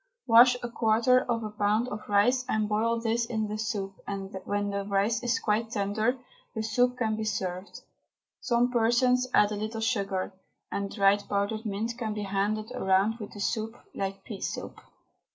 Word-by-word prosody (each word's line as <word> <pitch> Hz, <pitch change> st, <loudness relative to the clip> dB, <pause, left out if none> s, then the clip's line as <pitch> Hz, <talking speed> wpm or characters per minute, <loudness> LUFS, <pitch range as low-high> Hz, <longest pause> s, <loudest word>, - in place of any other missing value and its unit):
Wash 245 Hz, +1 st, +7 dB
a -, -, -1 dB
quarter 235 Hz, +2 st, +3 dB
of 230 Hz, -1 st, 0 dB
a 215 Hz, -, -4 dB
pound 210 Hz, +3 st, +1 dB
of 210 Hz, -1 st, -7 dB
rice, 245 Hz, +6 st, +3 dB
and 215 Hz, -1 st, +1 dB
boil 225 Hz, +2 st, +1 dB
this 230 Hz, 0 st, 0 dB
in 220 Hz, -2 st, -1 dB
the 210 Hz, +1 st, -4 dB
soup, 200 Hz, -3 st, -3 dB
and 195 Hz, 0 st, -5 dB
when 205 Hz, 0 st, -1 dB
the 200 Hz, 0 st, -2 dB
rice 200 Hz, +3 st, +1 dB
is 245 Hz, +1 st, +1 dB
quite 220 Hz, +1 st, 0 dB
tender 215 Hz, +3 st, 0 dB, 0.4 s
the 220 Hz, -, -2 dB
soup 245 Hz, +3 st, +1 dB
can 220 Hz, -3 st, 0 dB
be 220 Hz, -, -3 dB
served. 190 Hz, -3 st, -4 dB, 0.6 s
Some 240 Hz, 0 st, +1 dB
persons 250 Hz, +2 st, +3 dB
add 210 Hz, -3 st, +4 dB
a -, -, -1 dB
little 215 Hz, +2 st, -4 dB
sugar, 200 Hz, -5 st, -1 dB, 0.4 s
and 200 Hz, 0 st, -2 dB
dried 200 Hz, -1 st, +3 dB
powdered 205 Hz, +2 st, -1 dB
mint 225 Hz, +4 st, -3 dB
can 220 Hz, -3 st, -2 dB
be 210 Hz, -, -3 dB
handed 205 Hz, +3 st, -1 dB
round 195 Hz, +4 st, +2 dB
with 210 Hz, -, -8 dB
the 205 Hz, -, -9 dB
soup, 220 Hz, +3 st, -2 dB, 0.2 s
like 195 Hz, 0 st, -4 dB
pea 205 Hz, -2 st, -8 dB
soup. -, -, -5 dB
215 Hz, 180 wpm, -28 LUFS, 200-230 Hz, 0.6 s, Wash